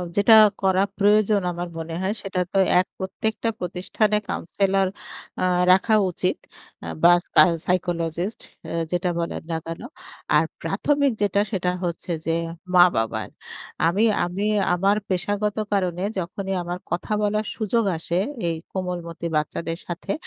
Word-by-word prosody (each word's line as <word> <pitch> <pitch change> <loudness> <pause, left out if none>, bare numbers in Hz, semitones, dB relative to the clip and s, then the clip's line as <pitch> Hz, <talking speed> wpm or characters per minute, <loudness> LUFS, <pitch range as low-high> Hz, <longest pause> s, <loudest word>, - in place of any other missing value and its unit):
যেটা 210 +2 +6 0.3
করা 190 0 +3
প্রয়োজন 210 0 +4
আমার 175 +1 -4
মনে 165 0 -5
হয় 195 +3 0
সেটা 190 -2 -2
তো 195 - +3 0.2
এক 185 - +1
প্রত্যেকটা 220 +4 -2
প্রতিষ্ঠানে 190 +4 0
counsellor 195 +2 0 0.6
আ - - +3 0.3
রাখা 190 +4 +4 0.2
উচিত 180 +1 0 0.5
আ - - -6 0.2
বা 175 +1 +8
সা - - +6 0.2
psychologist 175 +2 -1 0.3
আ - - -6 0.2
যেটা 180 0 0
বলেন 170 - -3
না 165 - 0
কেন। 165 +1 -6 0.6
আর - - +3 0.2
প্রাথমিক 285 -2 +1
যেটা 200 0 +2
সেটা 180 -2 0
হচ্ছে 175 0 -3
যে, 165 0 +1 0.4
মা-বাবার। 175 -11 +3 0.6
আমি 190 +6 +2 0.2
আমি 185 +4 -3 0.3
আমার 195 +4 +2
পেশাগত 205 +3 -1 0.2
কারণে 185 -2 0 0.2
যখনই 190 +2 -4
আমার 175 +1 -4
কথা 175 +4 -3
বলার 210 +1 0
সুযোগ 225 +1 0
আসে 170 +2 -1 0.3
এই 165 - -1 0.2
কোমলমতি 175 -3 -4
বাচ্চাদের 165 +2 -2
সাথে। 175 0 -4
185 Hz, 135 wpm, -23 LUFS, 175-205 Hz, 0.6 s, বা